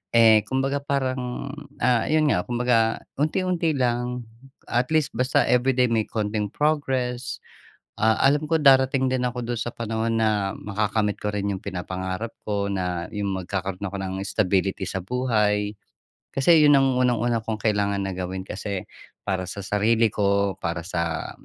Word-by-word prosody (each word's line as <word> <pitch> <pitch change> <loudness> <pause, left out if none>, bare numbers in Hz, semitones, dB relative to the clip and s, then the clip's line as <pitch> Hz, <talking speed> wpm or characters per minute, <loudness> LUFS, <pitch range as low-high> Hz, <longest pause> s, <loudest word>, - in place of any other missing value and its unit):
Eh, 110 -2 +7
kumbaga 135 +2 0
parang 130 -1 -2 0.2
ah, 120 -3 +2
'yon 155 0 +3
nga 90 - +1
kumbaga 120 0 +1 0.2
unti-unti 170 -1 0
lang. 125 -1 -1 0.4
At 125 +4 0
least 155 -6 +1
basta 125 +3 +2
everyday 125 0 +3
may 115 -1 +1
konting 105 -1 -2
progress. 130 -5 -1 0.6
Ah, 110 0 +4
alam 145 +3 +3
ko 165 - +3
darating 135 -2 +4
din 130 - 0
ako 125 0 -5
doon 120 -1 -3
sa - - -2
panahon 115 -1 -2
na 105 -3 +1
makakamit 105 0 -1
ko 105 - -2
rin'yong 100 -2 -2
pinapangarap 95 +3 -4 0.2
ko 100 -1 0
na 90 -3 -2
'yong 100 -3 -2
magkakaroon 95 +1 -4
ako 100 0 -4
ng 95 -1 -4
stability 95 -1 0
sa 95 - -3
buhay. 105 -3 0 0.6
Kasi 160 +5 +5
'yon 145 -1 +7
ang 135 -2 +2
unang 125 -1 +3
una 120 0 +1
kong 110 0 -3
kailangan 100 -2 +1
na 95 - -2
gawin 95 +1 -4
kasi 100 -1 -4 0.4
para 95 -2 -1
sa 100 +2 -6
sarili 110 +4 +2
ko, 100 -2 +1
para 85 -2 -3
sa 85 -3 -2
110 Hz, 155 wpm, -24 LUFS, 100-125 Hz, 0.6 s, Eh